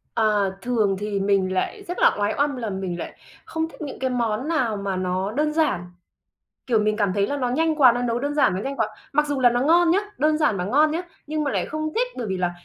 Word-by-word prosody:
Ờ, 210 Hz, -3 st, +2 dB
thường 220 Hz, -5 st, +1 dB
thì 205 Hz, -1 st, -2 dB
mình 195 Hz, -1 st, +1 dB
lại 405 Hz, -, -2 dB
rất 355 Hz, -, -4 dB
là -, -, +5 dB
oái 205 Hz, 0 st, +1 dB
oăm 285 Hz, 0 st, +1 dB
là 235 Hz, -4 st, -4 dB
mình 190 Hz, -3 st, -4 dB
lại -, -, -6 dB, 0.3 s
không 320 Hz, 0 st, -3 dB
thích -, -, -15 dB
những 290 Hz, -3 st, -6 dB
cái 260 Hz, -, 0 dB
món 240 Hz, 0 st, -1 dB
nào 255 Hz, -10 st, 0 dB
mà 200 Hz, -1 st, -3 dB
nó 185 Hz, +2 st, -1 dB
đơn 300 Hz, +5 st, 0 dB
giản. 310 Hz, -, +1 dB, 0.9 s
Kiểu, 235 Hz, -3 st, +3 dB
mình 210 Hz, 0 st, +1 dB
cảm 205 Hz, -3 st, +1 dB
thấy 200 Hz, +1 st, +1 dB
là 285 Hz, -, -2 dB
nó 255 Hz, -3 st, -1 dB
nhanh 315 Hz, +5 st, +1 dB
quá, 260 Hz, -5 st, +7 dB
nó 245 Hz, +1 st, -2 dB
nấu 235 Hz, -1 st, 0 dB
đơn 285 Hz, +3 st, -2 dB
giản, 285 Hz, -10 st, +3 dB
nó 185 Hz, -, -2 dB
nhanh 275 Hz, +6 st, -4 dB
quá, 220 Hz, -4 st, 0 dB, 0.2 s
mặc 300 Hz, +1 st, +2 dB
dù 285 Hz, -2 st, -1 dB
là 245 Hz, -1 st, +6 dB
nó 240 Hz, +1 st, 0 dB
ngon 335 Hz, +5 st, +4 dB
nhá, 360 Hz, -, +4 dB, 0.2 s
đơn 305 Hz, 0 st, +2 dB
giản 295 Hz, -10 st, +2 dB
mà 180 Hz, -, -2 dB
ngon 290 Hz, +10 st, +3 dB
nhá, 330 Hz, +3 st, -2 dB, 0.2 s
nhưng 305 Hz, 0 st, -2 dB
mà 285 Hz, -, 0 dB
lại -, -, -1 dB
không 310 Hz, 0 st, -3 dB
thích. -, -, +2 dB
Bởi 240 Hz, -, -3 dB
vì 190 Hz, -2 st, -2 dB
là 180 Hz, -1 st, 0 dB
245 Hz, 265 wpm, -23 LUFS, 205-300 Hz, 0.9 s, quá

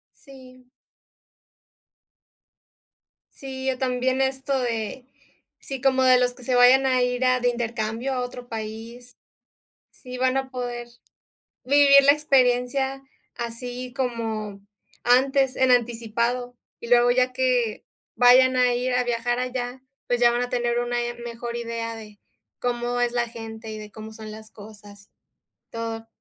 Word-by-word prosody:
Sí. 255 Hz, -2 st, -16 dB, 2.7 s
Sí, 265 Hz, -1 st, -4 dB
o 255 Hz, -, -4 dB
también 255 Hz, 0 st, 0 dB
esto 270 Hz, 0 st, 0 dB
de, 235 Hz, +1 st, -3 dB, 0.5 s
si 270 Hz, -2 st, -7 dB
como 265 Hz, -1 st, +2 dB
de 255 Hz, -1 st, +5 dB
los 245 Hz, 0 st, +1 dB
que 250 Hz, -, -9 dB
se 255 Hz, -, 0 dB
vayan 250 Hz, +2 st, +6 dB
a 255 Hz, -1 st, +2 dB
ir, 250 Hz, +1 st, 0 dB
ah, 255 Hz, 0 st, +3 dB
de 245 Hz, -, +2 dB
intercambio 235 Hz, +1 st, -2 dB
a 255 Hz, -, -1 dB
otro 245 Hz, 0 st, -6 dB
país, 230 Hz, +2 st, -8 dB, 0.8 s
sí 250 Hz, -1 st, -10 dB
van 260 Hz, +1 st, +1 dB
a 265 Hz, 0 st, -3 dB
poder 245 Hz, -1 st, -5 dB, 0.8 s
vivir 280 Hz, +1 st, +6 dB
la 280 Hz, -, +7 dB
experiencia 265 Hz, -2 st, +1 dB, 0.3 s
así 245 Hz, +1 st, -5 dB
como 225 Hz, -6 st, -3 dB, 0.4 s
antes, 265 Hz, +2 st, +3 dB
en 260 Hz, -1 st, +3 dB
anticipado, 240 Hz, +1 st, 0 dB, 0.2 s
y 235 Hz, -, -8 dB
luego 245 Hz, 0 st, +5 dB
ya 255 Hz, +1 st, +2 dB
que, 250 Hz, -3 st, 0 dB, 0.3 s
vayan 255 Hz, +1 st, +6 dB
a 250 Hz, -1 st, +3 dB
ir 250 Hz, +1 st, -1 dB
a 250 Hz, 0 st, +2 dB
viajar 240 Hz, 0 st, -1 dB
allá, 250 Hz, 0 st, -4 dB, 0.3 s
pues, 245 Hz, 0 st, 0 dB
ya 240 Hz, -, +6 dB
van 240 Hz, +1 st, 0 dB
a 245 Hz, -, -2 dB
tener 240 Hz, -1 st, 0 dB
una 240 Hz, 0 st, -1 dB
i 240 Hz, -, -4 dB
mejor 235 Hz, 0 st, -6 dB
idea 230 Hz, -1 st, -4 dB
de 210 Hz, -2 st, -12 dB, 0.4 s
cómo 245 Hz, 0 st, -2 dB
es 240 Hz, -1 st, +1 dB
la 240 Hz, -1 st, 0 dB
gente 225 Hz, -1 st, -8 dB
y 215 Hz, -, -6 dB
de 210 Hz, 0 st, -10 dB
cómo 220 Hz, 0 st, -10 dB
son 220 Hz, 0 st, -9 dB
las 215 Hz, 0 st, -11 dB
cosas, 205 Hz, -1 st, -14 dB, 0.6 s
todo. 225 Hz, 0 st, -5 dB
245 Hz, 145 wpm, -24 LUFS, 235-255 Hz, 2.7 s, la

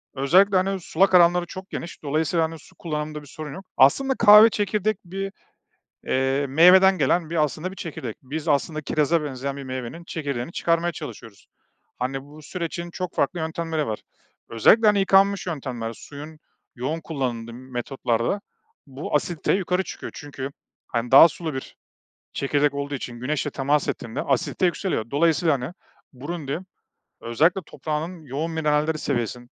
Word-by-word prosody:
özellikle, 185 Hz, +9 st, +4 dB
hani, 195 Hz, +1 st, 0 dB
sulak 185 Hz, +2 st, +2 dB
alanları 175 Hz, 0 st, +5 dB
çok 185 Hz, +2 st, -9 dB
geniş, 170 Hz, -, -7 dB
dolayısıyla, 155 Hz, +3 st, +1 dB
hani, 160 Hz, 0 st, -7 dB
su -, -, -19 dB
kullanımında 150 Hz, -2 st, -4 dB
bir 145 Hz, -, -15 dB
sorun 150 Hz, 0 st, -8 dB
yok. 195 Hz, -, -9 dB
Aslında 265 Hz, -, +5 dB
kahve 210 Hz, 0 st, +9 dB
çekirdek, 210 Hz, 0 st, 0 dB
bir, 195 Hz, +2 st, -5 dB, 0.7 s
iii, 135 Hz, +2 st, +1 dB
meyveden 180 Hz, +7 st, +6 dB
gelen, 160 Hz, +3 st, +1 dB
bir, 165 Hz, -2 st, +2 dB
aslında, 155 Hz, +5 st, -4 dB
bir 190 Hz, -, -11 dB
çekirdek. 135 Hz, -, -6 dB
Biz 150 Hz, +4 st, -5 dB
aslında 155 Hz, +2 st, +1 dB
kiraza 155 Hz, +2 st, +1 dB
benzeyen 135 Hz, 0 st, -4 dB
bir 140 Hz, -, -6 dB
meyvenin 130 Hz, +5 st, -6 dB
çekirdeğini 140 Hz, -4 st, -4 dB
çıkarmaya 170 Hz, 0 st, +1 dB
çalışıyoruz. 115 Hz, -10 st, -10 dB, 0.5 s
Hani, 130 Hz, +2 st, -2 dB
bu 150 Hz, +2 st, -14 dB
sürecin 170 Hz, +1 st, -5 dB
çok 180 Hz, 0 st, -5 dB
farklı 145 Hz, +5 st, 0 dB
yöntemleri 160 Hz, -1 st, -2 dB
var. 110 Hz, -, -3 dB, 0.5 s
Özellikle, 215 Hz, -, +5 dB
hani, 210 Hz, -1 st, +5 dB
yıkanmış 195 Hz, 0 st, +3 dB
yöntemler, 130 Hz, -8 st, -4 dB
suyun 150 Hz, +6 st, -10 dB, 0.4 s
yoğun 140 Hz, +6 st, -3 dB
kullanıldığı 125 Hz, -8 st, -4 dB
metotlarda 125 Hz, -, -2 dB, 0.5 s
bu 140 Hz, +2 st, -6 dB
asidite 165 Hz, +2 st, -1 dB
yukarı 185 Hz, -1 st, +1 dB
çıkıyor -, -, -8 dB
çünkü, 140 Hz, -2 st, -6 dB, 0.4 s
hani, 120 Hz, 0 st, -3 dB
daha 140 Hz, +5 st, +10 dB
sulu 160 Hz, -1 st, -6 dB
bir 130 Hz, -, -7 dB, 0.6 s
çekirdek 145 Hz, +1 st, +1 dB
olduğu 140 Hz, 0 st, -3 dB
için 120 Hz, -2 st, -7 dB
güneşle 145 Hz, +3 st, -2 dB
temas 140 Hz, +2 st, +1 dB
ettiğinde 115 Hz, +3 st, -4 dB
asidite 185 Hz, -, 0 dB
yükseliyor, 175 Hz, -, -1 dB
dolayısıyla, 160 Hz, +2 st, +3 dB
hani, 135 Hz, +4 st, -4 dB, 0.4 s
Burundi, 145 Hz, +2 st, -4 dB, 0.6 s
özellikle 155 Hz, +11 st, +2 dB
toprağının 155 Hz, +5 st, -4 dB
yoğun 150 Hz, +4 st, -3 dB
mineralleri 155 Hz, 0 st, +1 dB
seviyesi 120 Hz, -4 st, -2 dB
155 Hz, 150 wpm, -24 LUFS, 135-175 Hz, 0.7 s, daha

